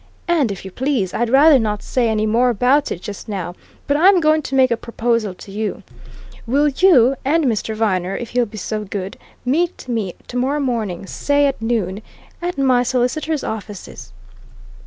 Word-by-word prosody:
And, 310 -10 +2
if 195 -1 -7
you 190 - -7
please, 245 -6 -1
I'd 240 0 0
rather 280 +2 +6
not 210 -2 -2
say 245 -3 0
any 215 -1 +1
more 235 +3 +3
about 250 +5 +2
it, 175 - -5
just 205 +2 -7
now, 185 -4 -4 0.3
but 285 - +1
I'm 365 +5 +5
going 310 -1 +3
to 270 - -4
make 260 -2 +4
a - - +3
proposal 230 -3 -1
to 195 - -12
you. 210 +1 -4 0.6
Will 285 +5 +3
you 275 -5 +5
and 310 +3 +2
Mr. 220 -2 -1
Viner, 195 -4 0
if 240 - -6
he'll 245 -1 +1
be 215 +1 -10
so 215 0 -3
good 195 -1 -5 0.3
meet 330 +4 0
me 220 -7 -2
tomorrow 260 +4 -1
morning, 225 -10 -2
say 285 +8 +1
at 275 -4 -1
noon, 215 -4 -1 0.4
at 350 -2 -3
my 260 -3 +3
solicitors' 255 +5 -1
offices?" 210 -2 -7
240 Hz, 180 wpm, -19 LUFS, 210-280 Hz, 0.6 s, rather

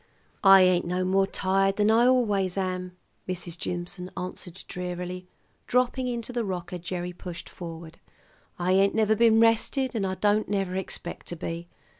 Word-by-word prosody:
"I 195 -1 +9
ain't 185 -1 +3
no 180 +1 0
more 195 +1 +2
tired 195 0 +1
than 210 +1 +3
I 235 +2 +5
always 205 -7 +2
am," 185 -1 -3 0.3
Mrs. 175 -2 -4
Jimson 180 +1 -5
answered 180 0 -7
drearily, 180 0 -5 0.4
dropping 250 +1 +1
into 240 0 -4
the 240 -1 -1
rocker 180 -2 -4
Gerry 180 +1 -4
pushed 175 0 -8
forward. 165 -1 -9 0.6
"I 180 +1 0
ain't 195 +1 +4
never 220 -1 +3
been 225 0 +5
rested, 230 +3 +2
and 205 -4 -1
I 190 - -2
don't 205 +3 +1
never 195 -2 -1
expect 185 -2 -6
to 175 - -5
be. 165 +1 -5
185 Hz, 160 wpm, -27 LUFS, 180-210 Hz, 0.6 s, I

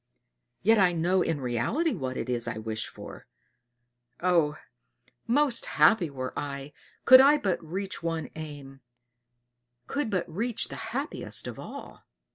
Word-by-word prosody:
Yet, 220 +2 +5
I 180 -2 +4
know 175 +3 +2
in 165 -4 0
reality 130 - 0
what 130 -1 -4
it - - -3
is 120 -2 -1
I - - -3
wish 110 -1 -3
for. - - -11 0.9
Oh! 170 -4 +2 0.7
most 255 -1 +2
happy 205 -8 +5
were 130 -2 -5
I, 140 0 -5 0.3
could 260 0 +10
I 285 +2 +6
but 190 -11 -1
reach 190 +4 -5
one 165 -1 -3
aim 145 -3 -9 1.0
could 285 -4 -2
but 185 -5 -1
reach 225 +8 -2
the - - -7
happiest 275 +6 -3
of - - -7
all!" - - -10
170 Hz, 140 wpm, -28 LUFS, 140-225 Hz, 1.0 s, could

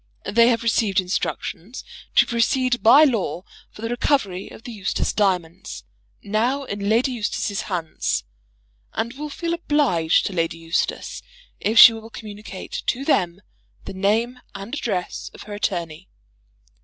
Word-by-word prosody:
They 230 +3 +4
have 235 -1 +2
received 220 -4 +2
instructions 185 +3 -3 0.3
to - - +7
proceed 245 +1 +1
by 270 +7 +8
law 225 - 0 0.3
for 215 - -12
the 230 - -2
recovery 240 -7 0
of - - -13
the 245 - -7
Eustace 200 -4 -2
diamonds, 175 - -1 0.4
now 240 +7 0
in 200 -5 -3
Lady 235 +4 +3
Eustace's 210 -3 -2
hands, 170 -4 -2 0.7
and 235 +2 -2
will 300 +2 -6
feel 335 +4 -3
obliged 285 - +2
to 200 - -3
Lady 165 -2 -1
Eustace 165 +1 -2 0.4
if 220 +3 0
she 235 - +11
will 225 0 -9
communicate 210 -3 -8
to 270 +3 -1
them 180 - +1 0.4
the - - -6
name 220 +6 0 0.2
and 200 +5 -8
address 195 -11 -3
of - - -10
her 210 - -9
attorney. 175 -4 -3
215 Hz, 145 wpm, -22 LUFS, 185-245 Hz, 0.7 s, she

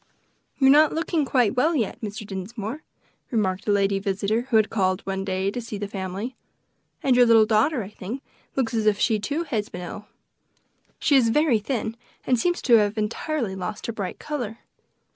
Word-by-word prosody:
"You 270 - +2
are 265 - +8
not 300 +1 +6
looking 325 -2 0
quite 250 -5 +2
well 315 +7 +2
yet, 230 -2 -1
Mr. 210 -1 -5
Dinsmore," 210 +7 -5 0.5
remarked 195 -6 -1
a - - +3
lady 200 -1 +2
visitor, 200 +5 -1
who 220 -2 +5
called 190 -3 0
one 195 0 -3
day 190 0 -1
to 245 - -4
see 225 -2 -6
the 205 0 -4
family; 195 +5 -5 0.7
"and 260 -2 +4
your 245 -1 +6
little 225 -1 +6
daughter, 225 +4 +2
I 190 - -8
think, 215 +6 -7 0.3
looks 255 -4 0
as 220 -2 +1
if 210 -1 +4
she, 220 0 +2
too, 290 +11 -2
had 225 -10 -3
been 180 - -6
ill; 190 +4 -8 0.9
she 290 - +2
is 245 -4 +5
very 280 -2 +3
thin, 225 0 -3 0.3
and 250 -2 +2
seems 350 +6 0
to 240 -2 +6
have 210 0 +1
entirely 225 +2 -2
lost 190 +3 -5
her 230 - -3
bright 200 -4 -4
color." 245 -8 -4
220 Hz, 190 wpm, -24 LUFS, 200-255 Hz, 0.9 s, are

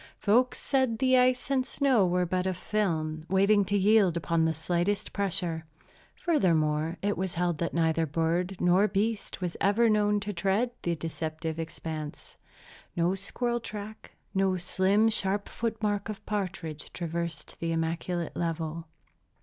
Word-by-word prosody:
Folks 245 +5 +2
said 260 -5 +1
the 260 +1 +3
ice 255 +1 +3
and 265 -1 +3
snow 255 -7 +2
were 180 0 +1
but 185 +1 -1
a 185 - -1
film, 160 -6 -1
waiting 200 +2 +4
to 205 +2 +1
yield 200 -3 +4
upon 165 0 +1
the 160 - +2
slightest 175 +5 -1
pressure. 175 -5 -1 0.5
Furthermore, 165 - +1
it 205 0 +1
was 190 -1 -2
held 175 -2 0
that 170 - -2
neither 165 -1 +2
bird 170 +5 0
nor 180 +4 +4
beast 210 0 -2
was 175 -2 -2
ever 220 +3 +4
known 210 -1 +2
to 205 +1 -4
tread 200 +7 +1
the 170 -1 -1
deceptive 160 0 -4
expanse. 160 -2 -6 0.6
No 175 +2 +2
squirrel 240 +5 -1
track, 215 -1 -8 0.2
no 190 -1 +2
slim, 190 +4 +2
sharp 200 -2 +1
foot 225 -1 -3
mark 205 0 0
of 215 - -7
partridge, 180 -7 -4
traversed 170 -2 -4
the 165 0 -2
immaculate 165 +1 -2
level. 165 -1 -3
185 Hz, 150 wpm, -28 LUFS, 165-210 Hz, 0.6 s, waiting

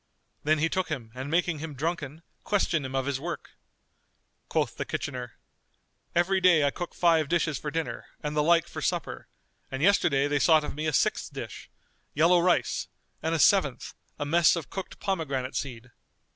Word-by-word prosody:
Then 155 +1 +3
he 155 +2 +2
took 185 +1 -1
him 125 -8 -5
and 130 +2 -6
making 170 -1 +1
him 155 -1 -6
drunken, 155 +1 -3 0.2
questioned 170 -8 +1
him 130 - -6
of 135 -1 0
his 140 -2 -1
work. 170 +3 -6 1.0
Quoth - - 0
the - - -3
kitchener, 125 -2 -5 0.8
"Every 185 +2 +2
day 175 -5 +5
I 140 - +2
cook 175 +4 -6
five 165 -4 +3
dishes 165 -5 +1
for 150 - -4
dinner 160 +1 -4 0.2
and 150 0 -3
the 150 - +3
like 165 +2 +4
for - - -7
supper; - - -2 0.4
and 135 +2 -3
yesterday 160 -7 +3
they 145 0 +1
sought 155 0 +5
of - - -5
me 155 +2 -3
a - - +1
sixth - - +1
dish,[FN#237] - - -10
yellow 170 +4 +5
rice,[FN#238] 180 0 +1 0.3
and 160 +1 0
a - - -1
seventh, 155 -8 +3 0.2
a 145 - -3
mess 170 +4 +4
of 165 -4 -6
cooked 190 -2 -6
pomegranate 140 -9 -2
seed." 125 -2 -5
155 Hz, 180 wpm, -27 LUFS, 140-170 Hz, 1.0 s, day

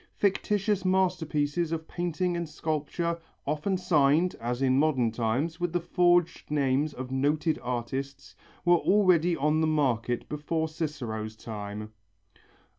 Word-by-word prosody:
Fictitious 205 0 +1
masterpieces 175 -4 +1
of 160 -1 -3
painting 175 +1 -1
and 170 -2 -3
sculpture, 160 +2 -2 0.3
often 155 +7 0
signed, 160 -1 +3
as 120 +1 -2
in 130 0 +3
modern 135 -7 +2
times, 125 +9 -1
with 175 -1 -1
the 175 - +2
forged 175 0 +2
names 145 0 +1
of 130 0 -7
noted 150 +4 +1
artists, 130 +3 -4 0.3
were 175 0 +6
already 180 -4 +3
on 150 +1 +1
the 160 - +2
market 125 -6 0
before 160 +2 -2
Cicero's 125 -9 -4
time. 105 -1 -7
155 Hz, 125 wpm, -28 LUFS, 130-175 Hz, 0.3 s, were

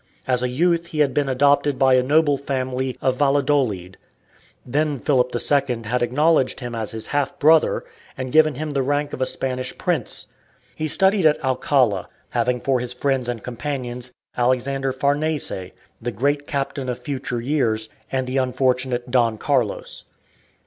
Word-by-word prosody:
As 125 -1 +1
a 125 - 0
youth 170 +5 +1
he 155 -2 -1
had 140 -3 +2
been 145 -2 +1
adopted 140 +1 +3
by 135 -1 +4
a 130 - +5
noble 145 +2 +3
family 130 -2 -3
of 130 -1 +1
Valladolid. 135 -10 +1 0.7
Then 145 +3 0
Philip 125 -2 +1
II 130 -2 +1
had 120 +3 -1
acknowledged 135 +3 +2
him 120 -2 -6
as 110 -2 -3
his 110 -1 -5
half 145 -1 0
brother, 155 +2 +4 0.3
and 130 -1 -4
given 155 -1 +4
him 155 +2 -4
the 140 -1 0
rank 145 +2 -1
of - - -5
a 130 - +2
Spanish 130 -1 -3
Prince. - - -2 0.5
He 155 - -2
studied 190 +2 +4
at 150 - +1
Alcala, 130 -6 +1 0.2
having 125 +1 0
for 130 0 +1
his 125 0 -4
friends 130 -1 0
and 115 -3 -4
companions 125 -1 -4 0.2
Alexander 130 +2 0
Farnese, 140 - -1 0.3
the 120 +1 -2
"Great 140 +6 -1
Captain" 135 -2 -3
of 125 - -2
future 130 -4 -3
years, 115 -4 0 0.2
and 130 -1 0
the 130 +1 -2
unfortunate 130 -1 0
Don 120 -3 +2
Carlos. - - -1
130 Hz, 160 wpm, -22 LUFS, 125-145 Hz, 0.7 s, a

